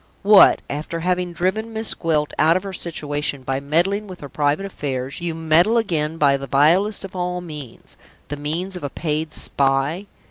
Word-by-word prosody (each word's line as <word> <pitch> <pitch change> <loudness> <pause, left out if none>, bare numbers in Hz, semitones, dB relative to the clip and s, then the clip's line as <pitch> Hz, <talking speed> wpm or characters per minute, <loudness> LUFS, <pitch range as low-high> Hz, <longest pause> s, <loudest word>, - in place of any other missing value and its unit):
What! 205 0 +6
after 155 +3 -4
having 180 0 -1
driven 190 +6 -2
Miss 220 0 +2
Gwilt 155 -3 -1
out 160 +3 +4
of 185 - -5
her 195 -1 -6
situation 145 -5 -3
by 135 +1 -2
meddling 175 +9 0
with 185 -2 -10
her 145 - -8
private 145 +6 0
affairs, 140 -6 -5
you 170 -2 -3
meddle 165 +7 +3
again 165 -8 0
by 140 -3 +3
the 135 0 -7
vilest 175 - +3
of 190 - -11
all 180 0 -2
means 150 -8 -9 0.3
the 145 - -3
means 165 +6 -2
of 180 - -7
a 145 - -2
paid 155 +1 -3
spy? 140 +9 0
165 Hz, 180 wpm, -21 LUFS, 145-185 Hz, 0.3 s, What